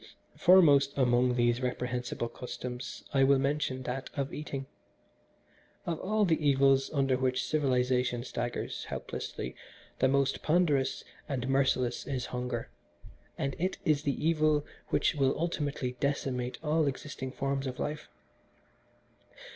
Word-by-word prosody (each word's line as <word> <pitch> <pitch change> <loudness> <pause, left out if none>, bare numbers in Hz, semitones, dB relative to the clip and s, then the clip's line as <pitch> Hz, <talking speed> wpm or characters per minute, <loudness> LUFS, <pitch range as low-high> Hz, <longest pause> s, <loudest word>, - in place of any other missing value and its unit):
"Foremost 145 -7 +6
among 125 -1 +3
these 120 0 +2
reprehensible 125 -1 -2
customs 125 0 -7
I 135 -1 +4
will 140 +1 +5
mention 135 -1 -1
that 130 +1 -4
of 140 -1 -2
eating. 140 -3 -5 1.2
Of 165 -2 -2
all 215 +2 +1
the 160 -3 +1
evils 135 -1 +4
under 135 -3 +2
which 130 0 0
civilisation 125 -4 +1
staggers 120 -1 -4
helplessly - - -5 0.4
the - - +4
most 140 0 +1
ponderous 150 -5 +2 0.3
and 130 -3 -2
merciless 130 -2 +1
is 135 -3 -2
hunger, 125 -2 -3 0.7
and 140 0 -2
it 185 +3 -1
is 155 -4 +3
the 145 +1 -1
evil 155 -2 +3 0.2
which - - +2
will 135 -1 +1
ultimately 145 -6 -1
decimate 130 -3 -1
all 155 0 +2
existing 130 -1 -4
forms 135 0 -2
of 125 - -5
life. 150 0 -4
135 Hz, 125 wpm, -30 LUFS, 125-150 Hz, 1.2 s, Foremost